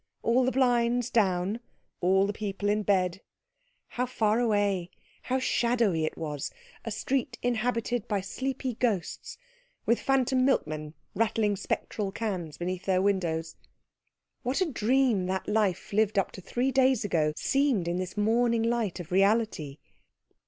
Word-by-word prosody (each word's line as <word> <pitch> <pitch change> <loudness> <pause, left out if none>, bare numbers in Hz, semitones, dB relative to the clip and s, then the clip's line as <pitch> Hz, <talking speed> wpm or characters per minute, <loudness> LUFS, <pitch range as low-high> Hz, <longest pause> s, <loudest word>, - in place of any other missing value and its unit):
All 245 +3 +3
the 260 - +2
blinds 245 -2 +2
down, 195 0 +1 0.4
all 190 +2 +3
the 205 - -2
people 205 -1 -3
in 210 +1 +2
bed 190 -2 +1 0.7
how 250 +1 -2
far 220 -2 +1
away, 205 -6 +1 0.3
how 255 - -1
shadowy 235 -10 +1
it - - -4
was; 150 -3 -4 0.3
a - - -4
street 260 -2 -2
inhabited 240 -1 0
by 205 -2 0
sleepy 260 +6 -3
ghosts, 235 - -2 0.5
with 235 - +3
phantom 260 -1 +2
milkmen 155 - 0 0.2
rattling 215 -1 +1
spectral 200 +1 -3
cans 185 -8 -4
beneath 180 +1 -4
their 185 -1 +2
windows. 170 -5 0 0.9
What 255 +1 -1
a 375 - +3
dream 240 -5 +2
that 190 0 -2
life 210 -3 0
lived 215 0 +2
up 195 - +2
to 190 - -10
three 245 +8 -1
days 260 -4 +3
ago 155 -6 +1
seemed 270 - +1
in 175 +1 0
this 185 +2 -4
morning 230 +2 +2
light 230 -5 0
of 175 -1 -8
reality. 195 -7 +1
210 Hz, 145 wpm, -28 LUFS, 185-245 Hz, 0.9 s, All